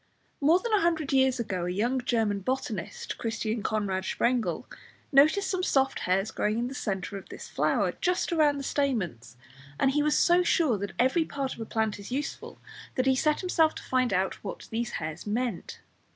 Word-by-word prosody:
More 310 +5 +5
than 460 +2 -3
a 415 - +4
hundred 320 -4 0
years 265 -1 +3
ago 190 -6 -2
a - - -1
young 240 +7 0
German 220 -5 +1
botanist, 225 -4 -4
Christian 225 -1 -2
Conrad 200 -3 -1
Sprengel, 240 +4 0 0.5
noticed 310 +8 +5
some 370 -1 -1
soft 270 -6 +1
hairs 195 +3 0
growing 210 +1 0
in 240 +1 -1
the 260 - -6
centre 195 -5 -3
of - - -16
this - - -9
flower, - - +1
just 360 -1 +1
round 300 -4 +3
the - - -5
stamens, 185 - -2 0.4
and 270 - +3
he 295 +2 +2
was 300 0 +2
so 350 +1 +5
sure 315 - +2
that 200 0 -4
every 260 +7 +3
part 275 -4 -3
of - - -13
a 225 - -4
plant 220 -2 -1
is 200 +3 -9
useful, 280 +3 -4 0.4
that 255 - +1
he 265 0 +4
set 300 +3 +1
himself 330 -4 +2
to - - -8
find 255 -1 +1
out 190 0 -1
what 200 - -7
these 230 +1 -2
hairs 155 +4 -5
meant. 230 -2 -3
250 Hz, 195 wpm, -28 LUFS, 205-285 Hz, 0.5 s, More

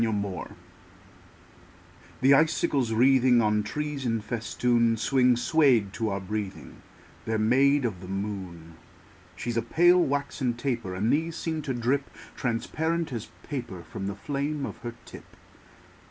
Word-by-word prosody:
SILVER 110 -2 +1
FILIGREE 95 -4 -6 1.7
The 135 +2 +6
icicles 140 -4 +2
wreathing 125 +1 +5
On 105 -1 +2
trees 150 +5 -4
in 115 -2 0
festoon 115 +1 0
Swing, 125 +1 +3
swayed 120 -8 +3
to 110 -1 -1
our 100 0 -2
breathing: 100 0 -6 0.4
They're 110 0 0
made 135 +5 +3
of 95 -7 -3
the 90 - -9
moon. 95 -5 -6 0.6
She's 120 +5 -3
a - - +3
pale, 175 +9 +4
waxen 140 -4 -1
taper; 120 -7 -3
And 105 +5 +1
these 160 +2 0
seem 160 -2 -3
to 140 -3 -3
drip 130 +4 0 0.3
Transparent 155 +6 -2
as 115 -2 -5
paper 120 - -6
From 95 +4 -6
the 100 - -3
flame 140 +6 -3
of - - -7
her 120 0 -7
tip. - - -13
120 Hz, 140 wpm, -27 LUFS, 105-140 Hz, 1.7 s, The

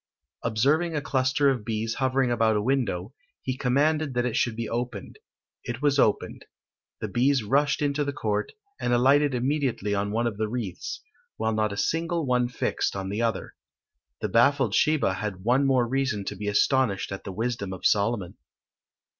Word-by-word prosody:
Observing 145 +10 +1
a - - +1
cluster 130 +1 +1
of 125 -5 -3
bees 110 0 -2
hovering 130 -1 +1
about 115 -2 +2
a 105 - +1
window, 115 -6 -1 0.3
he 130 - -2
commanded 140 +3 +1
that 120 0 +1
it 125 - -1
should 120 -2 +1
be 115 0 -3
opened: 120 -4 -5 0.4
it 120 +3 -5
was 145 -1 +3
opened; 105 - +1 0.6
the 110 - -2
bees 125 +4 +2
rushed 140 +7 +1
into 145 0 +1
the 140 - -2
court, 105 -6 -2 0.3
and 120 - 0
alighted 135 +3 +4
immediately 125 -5 -1
on 100 0 0
one 115 +2 0
of 110 -4 -2
the 110 0 -1
wreaths, 105 -6 -5 0.3
while 110 0 0
not 110 -1 0
a 100 - -5
single 165 +5 0
one 125 -1 +2
fixed 120 - -2
on 95 -1 -4
the 105 +3 -2
other. 115 -1 -2 0.7
The 105 - -1
baffled 120 +1 +3
Sheba 150 -7 +2
had 95 -2 -5
one 130 +5 +3
more 130 -3 +3
reason 130 -6 -1
to 105 - -4
be 105 +2 -5
astonished 105 -1 +1
at 95 - -6
the 100 - -6
wisdom 110 -1 -3
of 95 - -7
Solomon. 100 -3 +1
120 Hz, 180 wpm, -26 LUFS, 105-135 Hz, 0.7 s, alighted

